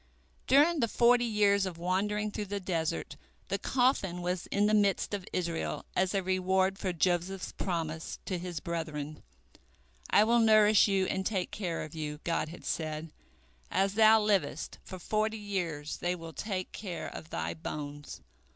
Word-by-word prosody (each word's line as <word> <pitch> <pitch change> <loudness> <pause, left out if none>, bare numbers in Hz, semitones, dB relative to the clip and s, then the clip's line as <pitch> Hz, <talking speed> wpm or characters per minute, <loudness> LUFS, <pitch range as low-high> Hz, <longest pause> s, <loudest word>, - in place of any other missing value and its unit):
During 300 +5 +5
the 235 - +2
forty 240 +2 +4
years 200 -3 +3
of 175 -3 -6
wandering 205 +4 0
through 205 0 -4
the 200 +1 -3
desert, 170 -4 -2 0.3
the - - -1
coffin 225 -9 +1
was 180 0 -2
in 205 +1 +1
the 210 - +2
midst 205 -1 +2
of 195 -3 -4
Israel, 170 -2 -2
as 185 +2 +1
a 195 - +1
reward 190 +1 +1
for 190 - -1
Joseph's 180 +2 0
promise 165 -3 -3
to 185 -2 -2
his 175 -1 -5
brethren, 155 -3 -4 0.9
"I 210 - +6
will 235 +2 +4
nourish 215 -2 +6
you 195 -2 +2
and 190 +1 -1
take 190 -2 -1
care 180 -5 -3
of 155 - -9
you." 150 -2 -4
God 165 -2 -1
had 170 - -11
said, 155 0 -3 0.6
"As 195 0 +1
thou 220 +1 +7
livest, 210 -3 0
for 185 - -8
forty 215 +4 -1
years 175 -8 -3
they 175 +1 -1
will 165 -2 -9
take 190 -1 -4
care 185 -5 -5
of 160 - -9
thy 80 +1 -3
bones." 145 - -7
185 Hz, 165 wpm, -30 LUFS, 165-210 Hz, 0.9 s, thou